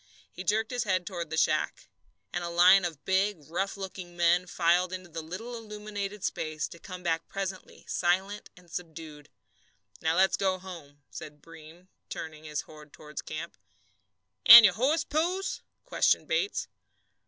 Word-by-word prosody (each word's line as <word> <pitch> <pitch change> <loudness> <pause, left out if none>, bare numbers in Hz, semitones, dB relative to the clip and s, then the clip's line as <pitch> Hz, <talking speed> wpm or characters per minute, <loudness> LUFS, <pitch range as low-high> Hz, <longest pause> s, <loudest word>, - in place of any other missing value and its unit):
He 185 - -8
jerked 220 +5 0
his 245 -1 -1
head 185 -3 0
toward 170 -4 -5
the 160 - -4
shack. - - 0 0.5
And 175 - -2
a 170 - -3
line 180 +2 +6
of 160 -4 -6
big, 190 +1 +2
rough 195 +5 -2
looking 185 -2 -8
men 175 +1 +3
filed 175 +1 +2
into 185 -1 -7
the 165 0 -5
little 190 +10 -7
illumined 210 -2 -6
space, 155 -1 -2
to 170 - -12
come 180 +1 -9
back 165 -1 -1
presently 195 -1 -6
silent 190 +4 0
and 175 -2 -18
subdued. 160 -4 -8 0.7
"Now 160 0 +1
let's 190 +2 +3
go 190 -1 +1
home," 165 -6 -11
said 150 -1 -9
Breem, 165 +3 -15 0.2
turning 155 -1 -7
his 150 -1 -3
horse 150 -1 -14
toward 150 -1 -9
camp. 160 +2 -6 0.9
"And 235 0 +12
your - - +5
horse, 290 +8 +1
Pose?" 350 +6 -1 0.2
questioned - - +2
Bates. - - -1
180 Hz, 155 wpm, -29 LUFS, 165-200 Hz, 0.9 s, And